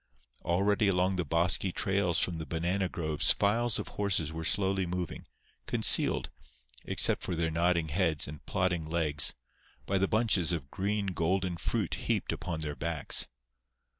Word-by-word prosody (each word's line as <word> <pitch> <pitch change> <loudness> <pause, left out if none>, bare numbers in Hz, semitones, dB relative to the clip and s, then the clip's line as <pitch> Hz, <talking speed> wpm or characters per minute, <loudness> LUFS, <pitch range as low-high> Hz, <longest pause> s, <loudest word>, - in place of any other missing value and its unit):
Already 100 +4 +1
along 95 0 +1
the 90 - 0
bosky 85 +4 +1
trails 95 -3 0
from 85 -3 -1
the 80 - -5
banana 90 +3 -1
groves 80 -4 +1
files 115 +2 +1
of - - -5
horses 90 -6 -1
were 80 0 -5
slowly 95 +1 +1
moving, 90 -1 -5 0.4
concealed, - - +4 0.5
except - - +2
for 90 - -3
their 80 0 -1
nodding 85 0 +1
heads 80 -1 +1
and 75 0 -10
plodding 90 -3 -1
legs, 75 -3 +2 0.5
by 95 0 0
the 95 - +2
bunches 105 -7 +2
of 75 -5 -4
green 100 +1 -2
golden 90 0 -1
fruit 85 - -2
heaped - - -1
upon 80 -2 -5
their 75 -1 -4
backs. 80 +2 +1
90 Hz, 150 wpm, -30 LUFS, 80-95 Hz, 0.5 s, concealed